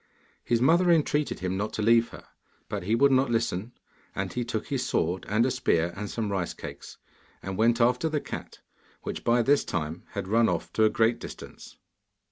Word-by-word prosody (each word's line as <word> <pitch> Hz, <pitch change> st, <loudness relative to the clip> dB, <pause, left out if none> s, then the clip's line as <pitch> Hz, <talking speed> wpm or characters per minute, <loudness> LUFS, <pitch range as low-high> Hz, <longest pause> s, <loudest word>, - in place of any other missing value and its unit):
His 120 Hz, 0 st, +1 dB
mother 170 Hz, +6 st, +4 dB
entreated 150 Hz, -, +1 dB
him 95 Hz, +1 st, -2 dB
not 105 Hz, +2 st, -3 dB
to 110 Hz, -, -2 dB
leave 115 Hz, +1 st, +4 dB
her, -, -, -12 dB, 0.4 s
but -, -, -4 dB
he 105 Hz, +6 st, +1 dB
would 140 Hz, +3 st, +4 dB
not 130 Hz, 0 st, +3 dB
listen, 115 Hz, -1 st, -1 dB, 0.4 s
and -, -, -3 dB
he 125 Hz, -, -1 dB
took 115 Hz, -2 st, -3 dB
his 135 Hz, -3 st, -1 dB
sword 90 Hz, -6 st, -1 dB
and 110 Hz, +3 st, +3 dB
a 130 Hz, -, +1 dB
spear 85 Hz, -9 st, +1 dB
and 105 Hz, +1 st, -5 dB
some 110 Hz, -3 st, -3 dB
rice 95 Hz, -3 st, -2 dB
cakes, -, -, -9 dB, 0.5 s
and 95 Hz, 0 st, -4 dB
went 115 Hz, +3 st, +3 dB
after 125 Hz, +6 st, +2 dB
the 155 Hz, -1 st, 0 dB
cat, -, -, -8 dB, 0.4 s
which -, -, -5 dB
by 120 Hz, 0 st, +3 dB
this 140 Hz, +3 st, +3 dB
time 80 Hz, +1 st, -3 dB
had 100 Hz, -2 st, -4 dB
run 115 Hz, +3 st, +3 dB
of 85 Hz, -2 st, -3 dB
to 110 Hz, -, +4 dB
a -, -, +5 dB
great 115 Hz, +2 st, +2 dB
distance. -, -, -10 dB
115 Hz, 200 wpm, -27 LUFS, 100-125 Hz, 0.5 s, a